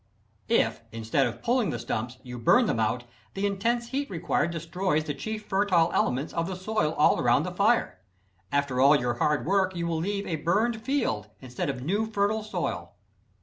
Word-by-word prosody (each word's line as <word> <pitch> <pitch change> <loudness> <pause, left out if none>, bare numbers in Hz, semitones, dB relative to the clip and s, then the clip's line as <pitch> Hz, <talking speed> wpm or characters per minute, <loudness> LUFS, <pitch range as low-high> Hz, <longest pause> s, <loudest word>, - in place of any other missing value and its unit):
If - - +2
instead 115 +4 0
of 120 0 -7
pulling 240 -5 +2
the 120 - -2
stumps, 120 +2 -4
you 125 -2 -7
burn 240 - +5
them 115 - 0
out, 110 +3 0 0.3
the 195 +1 -1
intense 235 +4 0
heat 280 +1 -2
required 175 -2 0
destroys 165 0 -1
the 150 - -3
chief 215 +9 -5
fertile 190 -5 +2
elements 135 +5 0
of 165 0 -1
the 190 - -4
soil 185 -4 -1
all - - +3
around - - +3
the - - -4
fire. - - +1 0.5
After 140 -3 +1
all 140 +3 +7
your 120 -3 0
hard 150 -1 +1
work 190 +1 +1
you 170 0 -2
will 165 -1 -1
leave 200 +4 -2
a 165 - -2
burned 215 +9 0
field 220 - -1
instead 125 +1 -4
of 130 -2 -4
new, 205 +9 0
fertile 215 0 0
soil. 170 - -4
170 Hz, 190 wpm, -27 LUFS, 130-205 Hz, 0.5 s, all